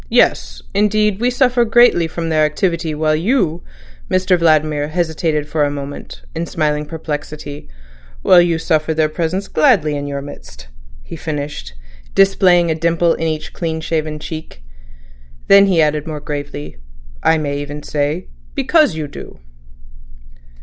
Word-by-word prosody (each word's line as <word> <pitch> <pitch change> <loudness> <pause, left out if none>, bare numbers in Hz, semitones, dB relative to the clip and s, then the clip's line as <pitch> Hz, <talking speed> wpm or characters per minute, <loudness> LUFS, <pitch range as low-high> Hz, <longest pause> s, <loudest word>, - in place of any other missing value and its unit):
Yes; - - +1
indeed, 210 -1 +2
we 245 +2 +2
suffer 250 -1 +2
greatly 230 -7 +4
from 165 0 -4
their 155 -1 +2
activity, 165 0 -1
while 155 0 +1
you"—Mr 170 - -1
Vladimir 155 -3 +2
hesitated 160 -2 -1
for 150 0 0
a 145 - +1
moment, 145 0 -7
in 165 +1 -3
smiling 150 -1 -1
perplexity—"while 145 - -2
you 170 -1 +1
suffer 160 -1 0
their 155 -1 +2
presence 175 +5 -2
gladly 175 - +3
in 145 0 -4
your 140 -1 -4
midst," 100 - -11 0.3
he - - -9
finished, 145 - -5 0.4
displaying 180 -3 +4
a - - +2
dimple 170 +1 +1
on - - -2
each 155 -1 -3
clean 160 -2 -3
shaven 155 -1 -2
cheek. 155 - -8 0.8
Then 200 0 +7
he 175 -4 +3
added 150 0 -1
more 155 -2 -4
gravely: 145 - -6 0.4
"I 160 - +3
may 145 -2 -2
even 145 +1 -6
say—because 185 - 0
you 155 -2 -4
do." 140 - -11
155 Hz, 135 wpm, -17 LUFS, 145-175 Hz, 0.8 s, Then